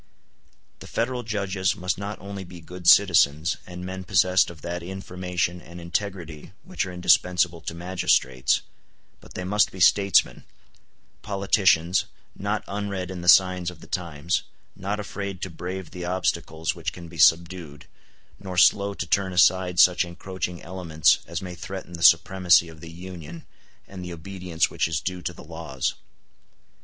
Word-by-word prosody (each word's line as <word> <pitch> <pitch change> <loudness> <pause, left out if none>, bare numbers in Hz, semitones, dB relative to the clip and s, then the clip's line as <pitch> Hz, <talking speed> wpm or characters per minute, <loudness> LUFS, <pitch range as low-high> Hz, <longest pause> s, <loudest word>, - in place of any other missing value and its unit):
The - - -11
Federal 125 +2 -2
judges 100 -4 -1
must 90 -1 -2
not 100 +1 -5
only 100 0 -7
be 90 -1 -11
good 90 +1 -9
citizens, 85 -5 +5
and 90 0 -8
men 95 0 -6
possessed 95 0 +3
of 80 -4 -13
that 85 0 -4
information 90 -1 -3
and 85 +1 -11
integrity 85 -2 -5
which 185 - -3
are - - -6
indispensable 90 -1 +2
to 85 - -6
magistrates, 85 -7 +1 0.6
but - - -16
they 90 - -4
must 105 +3 +2
be 95 - -10
statesmen—politicians, 95 -1 +1 0.3
not 105 +2 -2
unread 100 -2 -4
in 90 -2 -6
the 90 - -7
signs 90 -1 +5
of 90 -3 -12
the - - -13
times, 85 -2 -2 0.3
not 100 +2 -3
afraid 100 -2 -5
to 95 - -4
brave 90 +1 -6
the 90 -1 -6
obstacles 80 -3 -1
which 80 -3 -4
can 85 -1 -10
be 80 0 -11
subdued, 80 -2 +2 0.5
nor 95 -2 -7
slow 100 +2 +4
to 85 - -4
turn 95 +2 +1
aside 90 0 +3
such 90 -1 +6
encroaching 90 0 -6
elements 80 -4 +2
as 85 +2 -5
may 90 -1 -6
threaten 90 0 -8
the 85 - -7
supremacy 85 +1 +5
of 80 -1 -14
the 85 - -9
Union 85 -2 -9 0.4
and 95 -2 -9
the 90 -1 -6
obedience 90 0 -2
which - - 0
is 80 -2 -1
due 90 +1 -4
to 80 - -3
the - - -13
laws. 80 -4 -4
90 Hz, 155 wpm, -25 LUFS, 85-95 Hz, 0.6 s, such